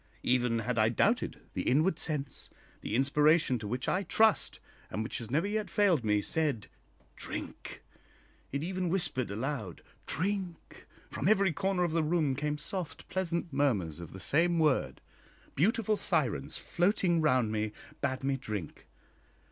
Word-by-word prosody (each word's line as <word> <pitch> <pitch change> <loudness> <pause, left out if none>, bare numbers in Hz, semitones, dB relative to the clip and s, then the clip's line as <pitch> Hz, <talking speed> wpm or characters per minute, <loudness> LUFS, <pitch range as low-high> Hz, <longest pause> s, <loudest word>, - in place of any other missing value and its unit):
Even 125 -2 +2
had 115 +1 -1
I 110 +1 +4
doubted, 115 - +1
the - - -2
inward 160 +6 +2
sense, 150 -4 -2 0.3
the - - -3
inspiration 150 0 +3
to 105 - -6
which 125 +4 -3
I 185 - +1
trust, 220 +3 +3 0.3
and 110 - -3
which 110 - -4
has 115 -3 -7
never 150 +8 +1
yet 210 +1 -2
failed 185 - +3
me, 105 -1 +2
said, 150 -9 -1 0.5
Drink! - - -7 0.7
It 140 +2 -2
even 185 0 -2
whispered 165 -9 +2
aloud, 110 - -4 0.2
Drink! 185 +1 -3 0.2
From 145 - -2
every 200 -4 +4
corner 190 +2 0
of 175 - 0
the 165 0 +2
room 155 -3 +1
came 150 +2 -2
soft 170 +2 -5
pleasant 170 -3 -2
murmurs 100 - 0
of 85 -1 -8
the 95 - -9
same 170 - +2
word. 155 -4 +1 0.5
Beautiful 215 - +2
sirens 150 - 0
floating 175 -2 +1
round 130 -7 +2
me 110 0 -1 0.3
bade 130 0 -1
me 135 0 0
drink. 105 - -6
150 Hz, 150 wpm, -31 LUFS, 120-175 Hz, 0.7 s, I